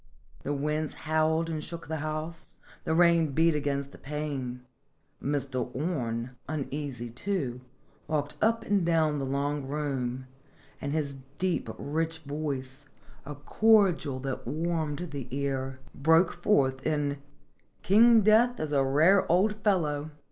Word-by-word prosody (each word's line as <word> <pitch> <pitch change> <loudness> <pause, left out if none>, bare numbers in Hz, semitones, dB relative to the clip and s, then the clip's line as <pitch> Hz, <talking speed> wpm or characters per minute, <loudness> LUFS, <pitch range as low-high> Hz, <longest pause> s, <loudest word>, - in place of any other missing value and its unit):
The 145 - -3
winds 150 +2 -1
howled 160 +1 +2
and 155 -2 -3
shook 170 +1 -7
the 160 +1 -2
house, 155 +2 -5 0.3
the 160 - +1
rain 170 -3 +4
beat 165 +3 +4
against 140 -2 -2
the - - -14
pane, 140 -4 -4 0.6
Mr. 135 -3 -1
Orne, 125 -6 -2 0.2
uneasy, 140 -5 -4
too, 130 - -3 0.5
walked 150 -2 -1
up 230 +1 +2
and 200 -3 +2
down 160 -3 +2
the 135 - -2
long 140 +1 -1
room, 135 -3 -2 0.6
and 140 - -3
his 140 -3 -2 0.2
deep, 185 -1 -1
rich 160 +2 -2
voice, 140 -2 -4 0.4
a 145 - -5
cordial 170 -4 +3
that 135 -3 -4
warmed 160 +2 -2
the 140 -4 -5
ear, 135 -1 -3
broke 160 +5 +4
forth 135 -10 +2
in 145 -2 0 0.3
" - - -38
King 225 +3 +6
Death 225 +4 +4
is 155 -1 -3
a 140 -2 +3
rare 160 +8 +4
old 195 +5 +4
fellow!" 155 -7 +1
150 Hz, 135 wpm, -28 LUFS, 140-165 Hz, 0.6 s, King